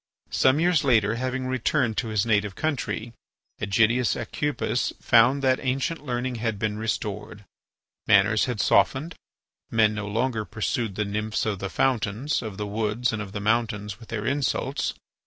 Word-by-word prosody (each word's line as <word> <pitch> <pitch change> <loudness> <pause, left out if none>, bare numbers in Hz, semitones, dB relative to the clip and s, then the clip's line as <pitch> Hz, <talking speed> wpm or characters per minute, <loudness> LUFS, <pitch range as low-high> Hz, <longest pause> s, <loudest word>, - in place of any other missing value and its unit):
Some 130 +3 +3
years 175 -3 +3
later, 115 -4 +3
having 130 0 -2
returned 130 -1 0
to 115 - 0
his 110 -1 0
native 105 -3 +1
country, 120 -7 -2 0.5
Ægidius 115 +4 +2
Aucupis 145 -4 -1
found 130 +4 +4
that 130 -1 +3
ancient 135 +5 -1
learning 125 -2 -2
had 115 -3 -1
been 105 0 -2
restored. 105 -2 -4 0.6
Manners 105 +1 +4
had 125 -4 -3
softened. 150 +10 +2 0.6
Men 110 -1 +3
no 105 -1 -4
longer 115 +1 -1
pursued 105 0 -2
the 105 - -1
nymphs 105 +2 -2
of 105 -3 -1
the 100 - -3
fountains, 120 - 0
of 105 -4 -6
the 105 - -3
woods, 110 +3 -1
and 110 - -2
of 100 -2 -7
the 105 - -4
mountains 105 -1 -1
with 115 - -14
their 110 -2 -3
insults. 140 +2 -1
115 Hz, 155 wpm, -25 LUFS, 105-130 Hz, 0.6 s, found